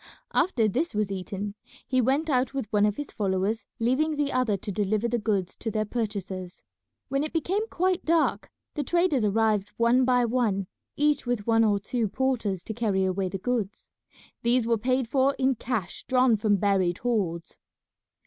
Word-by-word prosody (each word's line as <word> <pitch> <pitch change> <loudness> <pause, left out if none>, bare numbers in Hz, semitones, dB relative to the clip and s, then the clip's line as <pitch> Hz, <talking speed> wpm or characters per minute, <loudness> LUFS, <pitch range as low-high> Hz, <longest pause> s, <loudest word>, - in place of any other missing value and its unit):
After 245 - +2
this 255 - -1
was 210 -2 0
eaten 195 +1 -4 0.3
he 255 -1 +2
went 275 +6 +1
out 265 -2 +1
with 270 - -1
one 210 0 +4
of 205 - -1
his 290 +3 -6
followers, 205 +1 -1
leaving 270 +7 +1
the 290 -1 0
other 250 -5 +1
to 200 - -6
deliver 210 +3 0
the 240 0 0
goods 200 -4 -1
to 225 - -3
their 215 0 -1
purchasers. 200 -5 -4 0.5
When 275 +1 0
it 310 - -3
became 380 +7 -1
quite 370 -2 0
dark 330 -1 +1 0.2
the 300 - -2
traders 315 -3 +1
arrived 210 -1 +1
one 235 +2 +4
by 250 -1 +3
one, 225 -5 0 0.3
each 295 -3 +1
with 240 -4 -1
one 225 -1 +4
or 205 -2 +2
two 225 +3 -1
porters 225 -6 -1
to 220 - -5
carry 205 -4 0
away 190 0 -1
the 195 - -4
goods. 215 -1 -3 0.5
These 240 0 +2
were 230 -1 +1
paid 255 +2 +1
for 270 +3 +2
in 265 0 +2
cash 220 -6 -4
drawn 255 -2 +4
from 210 -1 +2
buried 190 -3 +1
hoards. 195 -9 -2
230 Hz, 175 wpm, -27 LUFS, 200-260 Hz, 0.5 s, one